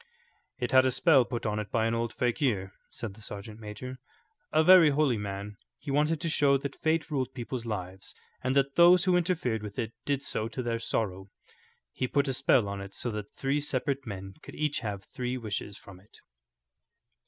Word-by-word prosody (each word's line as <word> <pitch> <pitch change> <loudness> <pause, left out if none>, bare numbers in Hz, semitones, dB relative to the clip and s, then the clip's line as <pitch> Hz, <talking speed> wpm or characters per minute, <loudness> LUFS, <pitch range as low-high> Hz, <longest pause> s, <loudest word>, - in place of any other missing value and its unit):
"It 125 -1 -2
had 130 0 +7
a 130 - +2
spell 135 -2 +5
put 120 -1 -4
on 105 0 0
it 105 -2 -5
by 110 +1 +1
an 115 - +1
old 115 0 -1
fakir," 120 -7 0 0.2
said 115 -4 -6
the 110 - -16
sergeant 105 +1 -8
major, 115 +4 -7 0.5
"a 155 +1 +4
very 180 -2 +8
holy 140 -5 +2
man. 100 0 -5 0.2
He 145 - -6
wanted 150 +3 +2
to - - -1
show 145 -3 +3
that 140 0 -7
fate 160 0 +1
ruled 135 -4 -2
people's 120 -1 -5
lives, 95 -3 -5 0.3
and 130 +1 0
that 140 0 +2
those 175 +1 +7
who 185 -1 +4
interfered 165 - 0
with 105 -1 -8
it 115 -2 -3
did 140 -1 -1
so 110 - -1
to 115 +3 -5
their 115 -1 -1
sorrow. 95 -4 -2 0.7
He 130 - -1
put 140 +2 +1
a 135 - 0
spell 120 -3 +3
on 100 0 -4
it 100 0 -9
so 120 - -3
that 105 -1 -6
three 140 +2 0
separate 140 -1 -1
men 95 -2 -6
could - - -11
each 150 -1 0
have 100 -4 -5
three 125 +3 -4
wishes 105 -3 -5
from 95 -2 -13
it." 100 +3 -20
120 Hz, 200 wpm, -29 LUFS, 105-140 Hz, 0.7 s, very